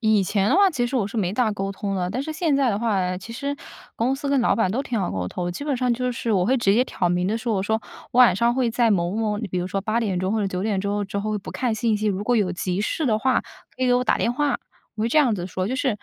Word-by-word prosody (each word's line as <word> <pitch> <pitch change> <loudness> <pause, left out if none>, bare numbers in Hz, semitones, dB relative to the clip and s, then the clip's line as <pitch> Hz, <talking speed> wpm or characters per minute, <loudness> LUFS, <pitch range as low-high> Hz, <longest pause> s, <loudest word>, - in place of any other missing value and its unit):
以 215 -3 +3
前 195 +1 +1
的 295 - +3
话 395 -1 +5
其 245 -7 0
实 255 - -5
我 225 -6 +1
是 220 - -7
没 185 -4 0
大 225 +1 +1
沟 195 -1 -3
通 195 0 -3
的， 180 -1 -1
但 255 +5 -2
是 315 - -4
现 310 -2 0
在 270 -3 +2
的 200 - -1
话 225 -2 0
啊， 180 0 -1
其 225 +5 -9
实 280 +4 -3 0.4
公 245 +4 +1
司 280 +1 -4
跟 275 -1 +3
老 - - +3
板 225 -5 +1
都 245 +7 -1
挺 245 -5 -2
好 185 - -1
沟 90 -2 -3
通， 175 - -3
基 180 +11 -6
本 290 -3 0
上 250 -1 +1
就 250 +1 -1
是， 230 -1 -3
我 185 -3 +2
会 260 +4 +3
直 200 -5 +3
接 250 - +4
挑 180 -8 -1
明 175 +1 0
地 215 +4 0
说。 230 -1 -1
我 190 - 0
说： 220 +2 0 0.3
“我 245 - 0
晚 240 -7 +7
上 235 +2 +2
会 255 -3 +1
在 235 0 +2
某 175 -4 +1
某” 215 -1 -1
你 215 -2 -4
比 180 - -2
如 180 - -2
说 195 +1 -2
8 220 +3 0
点 195 -6 -1
钟 185 +2 -1
或 220 - +1
者 200 - 0
9 185 -1 -3
点 205 -3 0
之 200 - -4
后 205 0 -1
之 200 +1 -4
后 215 +1 -1
不 195 - -9
看 240 -4 -1
信 225 -1 +1
息， 215 +1 -2
如 200 -1 0
果 245 +1 +2
有 195 -4 +1
急 180 +1 -2
事 285 +7 -1
的 215 -2 +2
话， 260 +3 +2 0.4
可 260 - -4
以 255 - +3
给 245 - +4
我 250 0 +2
打 - - +2
电 235 - +1
话， 285 +1 0 0.4
我 215 - -2
会 225 - +1
这 305 - +3
样 255 -7 +4
子 180 -3 -4
说。 185 0 -3
就 255 - -2
是， 270 0 0
220 Hz, 350 characters per minute, -23 LUFS, 195-250 Hz, 0.4 s, 晚